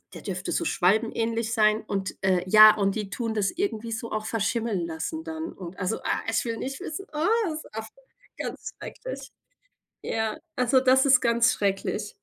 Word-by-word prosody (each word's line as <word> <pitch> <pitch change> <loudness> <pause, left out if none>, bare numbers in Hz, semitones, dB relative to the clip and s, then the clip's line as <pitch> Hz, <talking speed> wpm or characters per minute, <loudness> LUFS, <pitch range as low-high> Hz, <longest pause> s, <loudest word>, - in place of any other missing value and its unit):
der - - -8
dürfte - - -4
so 340 - 0
schwalbenähnlich 225 - +1
sein 215 0 +3
und, 195 -1 -3
äh, 185 -2 +2
ja, 215 +2 +9
und 195 -1 0
die 210 -3 -3
tun 230 -2 -2
das 200 -2 +1
irgendwie 235 - -3
so 230 +1 -5
auch 215 0 -2
verschimmeln 220 -4 -1
lassen 170 - -4
dann. 320 0 -5
Und, 180 -1 -9
also, 185 +3 -1
ah, - - 0
ich 225 - +1
will 230 -1 -2
nicht 270 +3 -5
wissen, 350 +6 -5
ah, 305 +4 0 0.3
es 310 - -6
auf 220 0 -5 0.5
ganz - - -6
schrecklich. - - -8 0.7
Ja, 220 +4 -2 0.2
also 250 +1 +3
das 265 +1 +4
ist 260 -2 +6
ganz 235 0 +4
schrecklich. 205 +1 -2
225 Hz, 175 wpm, -26 LUFS, 205-255 Hz, 0.7 s, ja